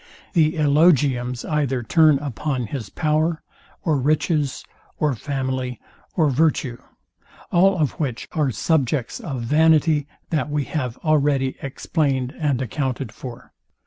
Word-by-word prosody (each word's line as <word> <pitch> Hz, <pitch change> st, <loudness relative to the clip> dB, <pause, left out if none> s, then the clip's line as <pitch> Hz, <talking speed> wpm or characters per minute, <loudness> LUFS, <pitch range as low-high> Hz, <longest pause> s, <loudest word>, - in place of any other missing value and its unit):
The 160 Hz, -4 st, +3 dB
elogiums 140 Hz, -6 st, +2 dB
either 140 Hz, -5 st, 0 dB
turn 155 Hz, +3 st, +5 dB
upon 135 Hz, -1 st, -3 dB
his 115 Hz, -3 st, -5 dB
power, 155 Hz, -, 0 dB, 0.4 s
or 155 Hz, -6 st, +1 dB
riches, 150 Hz, 0 st, 0 dB, 0.3 s
or 150 Hz, -2 st, +1 dB
family, 130 Hz, 0 st, -3 dB, 0.4 s
or 155 Hz, -5 st, +3 dB
virtue; 130 Hz, -4 st, +1 dB, 0.7 s
all 185 Hz, +2 st, +4 dB
of 150 Hz, -5 st, +1 dB
which 130 Hz, -6 st, -3 dB
are 150 Hz, -4 st, +1 dB
subjects 130 Hz, +1 st, 0 dB
of 135 Hz, -7 st, -5 dB
vanity, 155 Hz, +2 st, +3 dB, 0.2 s
that 150 Hz, -4 st, 0 dB
we 145 Hz, -1 st, 0 dB
have 130 Hz, -4 st, -3 dB
already 140 Hz, -3 st, +2 dB
explained 135 Hz, -2 st, -1 dB
and 145 Hz, -5 st, +1 dB
accounted 130 Hz, -2 st, -3 dB
for. 120 Hz, +1 st, -10 dB
145 Hz, 120 wpm, -22 LUFS, 130-155 Hz, 0.7 s, turn